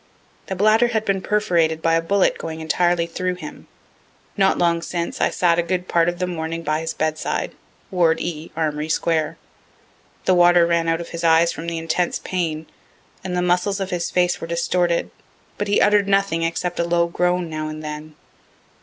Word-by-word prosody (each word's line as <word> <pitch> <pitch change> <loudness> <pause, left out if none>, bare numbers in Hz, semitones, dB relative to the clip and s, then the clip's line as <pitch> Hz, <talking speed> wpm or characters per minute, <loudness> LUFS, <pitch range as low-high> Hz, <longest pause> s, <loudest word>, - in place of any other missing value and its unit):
The 190 - -3
bladder 215 +5 +4
had 220 -2 -1
been 195 -1 0
perforated 175 -6 +1
by 165 0 +1
a 165 - +3
bullet 195 +3 +1
going 160 -1 -5
entirely 170 +2 +1
through 180 +2 -3
him. 180 - -10 0.7
Not 195 -2 +3
long 170 -1 +2
since 170 0 -4
I - - +3
sat 170 -1 +2
a - - +5
good 180 +1 -2
part 170 0 +3
of 175 - -4
the 180 - -1
morning 165 -1 -4
by 155 0 0
his 160 - -4
bedside, 155 0 -2 0.4
ward 170 -3 +2
E, 160 -1 -5
Armory 155 -1 -1
square. 160 -1 0 0.9
The 185 - +4
water 175 -1 +5
ran 170 -1 +1
out 165 0 +1
of 170 - -8
his 170 - -6
eyes 165 +1 +4
from 170 - -7
the 170 -1 -2
intense 165 +2 -1
pain, 160 -4 -3 0.6
and 180 -1 -3
the 180 - +1
muscles 180 +3 +1
of 190 -1 -3
his 175 -1 -2
face 180 -1 +1
were 165 - -5
distorted, 170 0 0 0.5
but 205 - -1
he 205 - +3
utter'd 205 -1 +4
nothing 195 -4 +1
except 175 +1 -2
a - - +3
low 170 0 +2
groan 180 +1 0
now 155 -1 -4
and 155 0 -7
then. 150 0 -7
170 Hz, 190 wpm, -21 LUFS, 165-180 Hz, 0.9 s, a